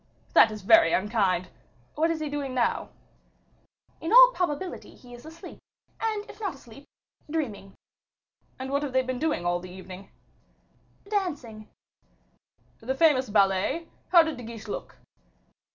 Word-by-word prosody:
"That 225 - +7
is 215 -2 -8
very 330 - +6
unkind. 190 -3 +1 0.4
What 320 +2 +1
is 330 -1 -1
he 310 - -3
doing 285 -3 -4
now?" 240 -2 0 1.1
"In 325 - -3
all - - +9
probability 360 -1 -4
he 245 -1 -15
is 240 +5 -12
asleep, 325 +1 -11 0.4
or, 450 - +1 0.2
if 420 - -13
not 395 -8 -3
asleep, 265 +1 -15 0.4
dreaming." 225 -11 -4 0.8
"And 260 +1 -6
what 280 +1 +1
have 285 -3 -4
they 260 0 +3
been 255 -1 -4
doing 305 - -1
all 175 0 +1
the 180 +1 -10
evening?" 185 +1 -11 1.0
"Dancing." 290 - -3 1.1
"The 255 +3 -3
famous 270 -5 +3
ballet? 200 - +1 0.2
How 345 -2 +7
did 320 -3 -4
De 245 - -9
Guiche 225 -1 -9
look?" 205 - -7
260 Hz, 145 wpm, -26 LUFS, 215-320 Hz, 1.1 s, all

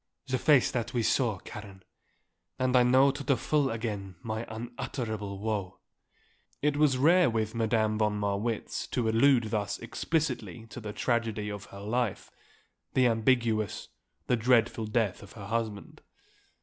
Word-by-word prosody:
The 130 -2 -1
face 145 -2 +4
that 120 0 -3
we 120 - +1
saw, 115 -2 +1
Karen. 95 -1 -10 0.7
And 130 0 +1
I 125 - +7
know 130 +3 +5
to 140 +1 -7
the 140 -2 +2
full 145 +1 +1
again 105 -5 -4
my 110 0 -4
unutterable 110 -3 -5
woe." 100 -3 -3 0.8
It 150 0 +1
was 145 -3 +3
rare 170 +4 +5
with 110 -1 -1
Madame 110 -1 +1
von 105 -1 +1
Marwitz 105 +2 -2
to 120 -3 +1
allude 115 0 +4
thus 105 -3 -1
explicitly 145 -7 -2
to - - -7
the 110 -3 -6
tragedy 110 -1 -1
of 105 -1 -7
her 100 - -11
life, 115 +1 -2 0.6
the 130 - +5
ambiguous, 115 -2 +1 0.4
the 125 - +2
dreadful 115 -1 +2
death 110 -3 0
of 100 - -13
her 100 -3 -9
husband. 110 -1 -4
115 Hz, 150 wpm, -29 LUFS, 105-125 Hz, 0.8 s, I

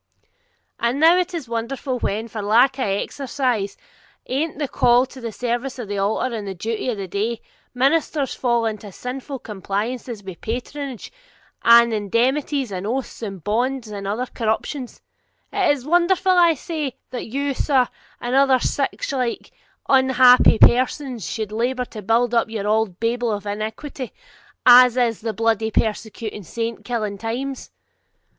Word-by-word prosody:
'And 235 +4 0
now 325 +3 +7
is 365 0 -1
it 310 -7 -5
wonderful, 250 +3 -3
when, 220 +2 -2
for 220 -1 -6
lack 245 +6 +3
of 255 - 0
exercise 235 0 -2 0.5
anent 285 +4 -2
the 290 -2 -2
call 245 0 +4
to 260 0 -13
the 230 -1 -4
service 245 +4 -3
of 240 -4 -6
the 200 0 -3
altar 220 +5 0
and 210 -2 -5
the 190 - -5
duty 225 +6 -3
of 230 - -2
the 195 -1 -5
day, 215 +5 -2 0.4
ministers 280 +1 +1
fall 235 -2 +1
into 215 -2 -4
sinful 265 +6 -6
compliances 215 +2 -4
with 190 -3 -9
patronage, 255 +2 -5 0.5
and 235 0 +7
indemnities, 250 +5 0
and 190 +1 -4
oaths, 255 +2 -3
and 195 -6 -6
bonds, 245 +2 -1
and 200 -2 -6
other 220 +5 -1
corruptions, 245 +3 -3 0.5
is 295 -10 +2
it - - -10
wonderful, 355 +3 +3
I 345 -3 +5
say, 305 -3 -4 0.2
that 250 - -5
you, 280 +4 -1
sir, 260 -2 +2 0.3
and 240 +1 -3
other 270 -1 +5
sic - - -1
like 250 -3 -2 0.4
unhappy 260 -3 +6
persons, 250 - +3
should 215 -3 -4
labour 250 +3 -1
to 220 -3 -9
build 230 +4 +2
up 230 -1 +2
your 215 -2 -3
auld 215 -4 0
Babel 235 +1 0
of 205 -1 -4
iniquity, 220 +5 -5 0.5
as 250 0 +8
in 240 -2 +3
the 225 0 -2
bluidy 225 0 0
persecuting 220 -1 -2
saint 230 +5 -4
killing 215 -5 -3
times? 255 +5 -4
240 Hz, 155 wpm, -22 LUFS, 220-265 Hz, 0.5 s, as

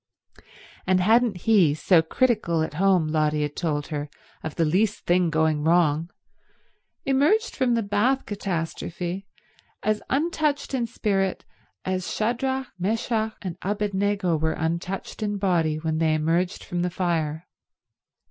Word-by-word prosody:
And 185 0 +4
hadn't 220 +2 +3
he, 190 -10 +5
so 165 +2 +4
critical 170 -4 +1
at 160 - -4
home, 185 -5 +4
Lotty 155 -1 +1
had 145 0 -4
told 150 -4 -2
her, 150 -1 -4 0.3
of 155 - -6
the 165 - +2
least 200 +7 +1
thing 175 0 +3
going 160 -1 +1
wrong, 165 -1 +3 1.0
emerged 300 - +2
from 250 -3 +2
the 230 - 0
bath 210 +7 +1
catastrophe 180 -1 -4 0.6
as 215 0 +1
untouched 300 -1 0
in 240 -3 0
spirit 195 -5 -1 0.4
as 185 -1 -2
Shadrach, 260 +4 -1
Meshach 220 +2 -1
and 180 -4 -5
Abednego 200 -2 0
were 160 +1 0
untouched 170 +6 -3
in 205 -1 -1
body 175 -6 +1
when 160 0 -2
they 160 -1 +2
emerged 165 +4 0
from 175 0 -3
the 180 - 0
fire? 165 -3 -1
185 Hz, 135 wpm, -25 LUFS, 160-215 Hz, 1.0 s, he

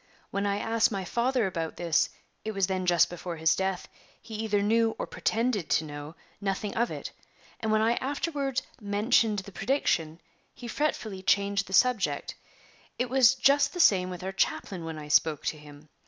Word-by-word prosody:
When 200 +1 -1
I 200 0 0
asked 225 +1 +1
my 195 -3 -3
father 240 +4 +1
about 165 -4 -3
this 170 -3 +2 0.3
it 220 - -3
was 195 -2 +2
then 185 -1 -2
just 175 -1 +5
before 175 0 -6
his 160 0 +3
death 190 -1 -2 0.3
he 225 - -12
either 210 -2 0
knew, 225 +1 +2
or - - -3
pretended 225 -6 -1
to - - +2
know, 145 +1 -8 0.3
nothing 200 +1 -2
of 235 +1 +1
it; - - -6 0.5
and 220 - -1
when 215 0 +3
I 230 +2 +2
afterward 280 -1 -2 0.2
mentioned 210 +1 +2
the 200 0 -6
prediction 170 - 0 0.4
he 240 - -9
fretfully 220 -7 -2
changed 200 +1 +1
the 190 - -8
subject. 195 - +2 0.6
It 250 0 -2
was 260 -1 +6
just 280 +1 +3
the 355 - -6
same 185 - +5
with 180 -1 -7
our 190 - -3
chaplain 190 -2 -1
when 160 -1 -5
I 150 -1 -8
spoke 150 0 +2
to 155 - -1
him. 150 0 -14
200 Hz, 185 wpm, -28 LUFS, 175-230 Hz, 0.6 s, was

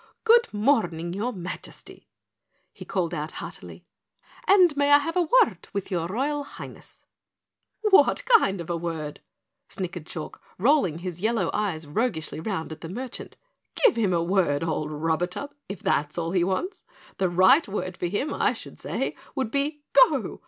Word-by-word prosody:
"Good 470 +1 +5
morning, 205 - +1
your 215 +6 -2
Majesty!" 180 -5 -9 0.7
he - - -11
called 180 -4 -1
out 155 0 -4
heartily. - - -9 0.6
"And 365 -6 +6
may 285 0 +2
I 290 - +10
have 310 +4 -3
a 360 - +3 0.2
word - - -11
with 200 0 -4
your 170 -2 -1
Royal 285 +9 -1
Highness?" - - -12 0.8
"What 420 +2 +4
kind 445 - +4
of 170 0 -5
a - - 0
word?" 160 -3 -5 0.5
snickered 175 -3 -5
Chalk, 155 -3 -7 0.2
rolling 230 - +3
his 180 0 -6
yellow 225 +2 +1
eyes 185 -7 -2
roguishly 160 -1 -2
round 160 -2 -3
at 160 - -8
the 165 - -7
merchant. 245 +7 -7 0.5
"Give 460 - +6
him 215 -5 +1
a 170 -1 +1
word, 170 -5 +1
old 155 -2 -2
Rub 160 +2 -1
atub, 180 +11 -3 0.2
if 195 -2 -7
that's 150 +2 0
all 165 -1 -2
he 180 -2 +2
wants. 190 - -2 0.4
The 190 -2 +2
right 185 - +5
word 185 -3 -4
for 175 - -2
him, 205 - -2
I - - +2
should - - -10
say, - - -3 0.2
would 260 -5 -2
be 290 +1 -1
'GO!' - - +4
190 Hz, 165 wpm, -25 LUFS, 170-280 Hz, 0.8 s, I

